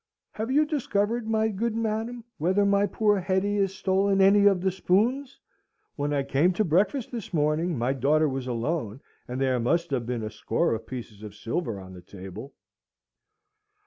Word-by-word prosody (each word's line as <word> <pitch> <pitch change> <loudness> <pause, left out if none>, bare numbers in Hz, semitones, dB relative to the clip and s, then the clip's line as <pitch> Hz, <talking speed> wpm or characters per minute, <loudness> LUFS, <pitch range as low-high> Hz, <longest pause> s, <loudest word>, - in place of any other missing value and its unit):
"Have 220 +2 -4
you 295 +4 +3
discovered, 230 -6 -1
my 220 0 +2
good 220 +2 -2
madam, 225 +2 -2 0.2
whether 185 +6 +2
my 200 0 +3
poor 210 -2 +2
Hetty 190 +2 0
has 195 -1 0
stolen 195 +1 +1
any 200 +1 +6
of 195 -2 +4
the 190 0 +1
spoons? 245 +10 0 0.6
When 145 0 -2
I 140 -1 +1
came 150 +7 +2
to 215 - +1
breakfast 205 - +1
this 235 -5 -6
morning, 155 +2 +1
my 120 +3 0
daughter 150 +4 +2
was 135 -2 -4
alone, 125 0 -3 0.3
and 125 +1 -4
there 130 -2 +1
must 170 +7 0
have 125 -4 -1
been 120 -2 -2
a 110 - -4
score 110 +2 0
of 115 - -5
pieces 115 -5 -8
of 105 -1 -9
silver 115 - -3
on 95 -1 -11
the 90 - -11
table." 95 +8 -10
180 Hz, 175 wpm, -26 LUFS, 130-205 Hz, 0.6 s, any